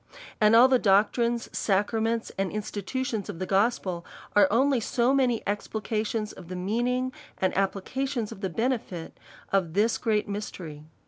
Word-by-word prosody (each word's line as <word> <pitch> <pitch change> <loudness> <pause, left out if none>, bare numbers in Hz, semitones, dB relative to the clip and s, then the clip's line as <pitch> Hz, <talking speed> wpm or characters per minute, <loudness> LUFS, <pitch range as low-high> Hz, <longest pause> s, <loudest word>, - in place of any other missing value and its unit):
And 215 +1 +6
all 240 +3 +8
the 260 -1 +4
doctrines, 235 +4 +2
sacraments, 225 +3 0
and 195 -1 -1
institutions 215 +2 -3
of 195 - -5
the 185 - -3
g'ospel, 195 -3 +1 0.3
are 205 -2 +7
only 265 +4 +3
so 240 +3 +1
many 255 -4 +2
explica 215 +1 -2
tions 215 -1 -3
of 180 - -12
the 185 - -6
meaning, 240 +7 -1 0.2
and 185 - 0
applications 220 +5 -1
of 195 - -9
the 190 - -1
benefit 220 -5 -2 0.4
of 185 -5 +1
this 220 +3 +2
great 215 -3 +1
mysteiy. 175 -7 -6
215 Hz, 150 wpm, -27 LUFS, 195-235 Hz, 0.4 s, all